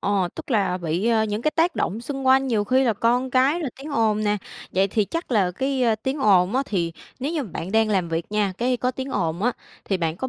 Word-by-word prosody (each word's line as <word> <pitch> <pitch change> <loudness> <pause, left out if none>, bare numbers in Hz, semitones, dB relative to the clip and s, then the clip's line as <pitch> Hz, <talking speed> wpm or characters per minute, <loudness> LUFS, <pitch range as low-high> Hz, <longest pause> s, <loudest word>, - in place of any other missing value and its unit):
ờ, 195 -3 +1
tức - - -9
là 195 -6 +1
bị, 170 +5 -1
ờ, 225 -2 +3
những 210 +2 -3
cái 305 - +2
tác 330 +1 +1
động 210 +5 -1
xung 270 +2 -5
quanh 265 +1 +5
nhiều 215 -5 +1
khi 260 +4 +3
là 230 - +3
con 245 +4 +1
cái 270 +7 +3
rồi 280 -6 -3
tiếng 290 +3 -8
ồn 215 -5 +1
nè. 210 0 +2 0.4
Vậy 195 +1 +2
thì 210 +1 +1
chắc 330 - -5
là 195 -5 +3
cái, 265 +7 -1
ơ, 230 -2 +3
tiếng 265 +3 -2
ồn 195 -2 +4
á 270 - +2
thì 170 -5 -1 0.3
nếu 285 +5 -2
như 310 -4 -1
mà 215 - -8
bạn 180 +4 -5
đang 220 0 +3
làm 185 -4 +1
việc 165 0 -2
nha, 205 -3 +1
cái 250 +1 +1
có 250 +1 0
tiếng 260 +1 -6
ồn 170 -2 -1
á, 245 +1 +2 0.3
thì 195 - 0
bạn 165 -2 -2
có 260 - -3
225 Hz, 270 wpm, -23 LUFS, 195-260 Hz, 0.4 s, quanh